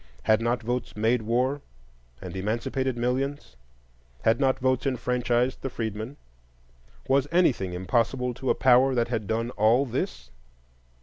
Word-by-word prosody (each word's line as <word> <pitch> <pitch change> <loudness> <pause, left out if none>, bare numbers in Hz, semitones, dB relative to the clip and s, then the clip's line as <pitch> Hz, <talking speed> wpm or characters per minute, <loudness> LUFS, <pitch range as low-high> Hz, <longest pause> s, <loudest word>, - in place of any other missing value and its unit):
Had 110 +1 +3
not 120 +1 0
votes 125 +1 -3
made 115 +3 +2
war 125 +6 0 0.6
and 90 0 -7
emancipated 120 +6 -2
millions? 130 - -2 0.7
Had 110 +1 +3
not 135 -2 +2
votes 130 +1 0
enfranchised 125 0 0
the 135 - -3
freedmen? 110 +2 -5 0.9
Was 135 +1 +2
anything 130 - +2
impossible 120 +7 0
to 130 +2 -4
a - - +3
power 130 +2 +4
that 120 -1 +1
had 110 -4 -2
done 115 +2 -1
all 115 +5 +3
this? - - -4
120 Hz, 135 wpm, -26 LUFS, 110-130 Hz, 0.9 s, power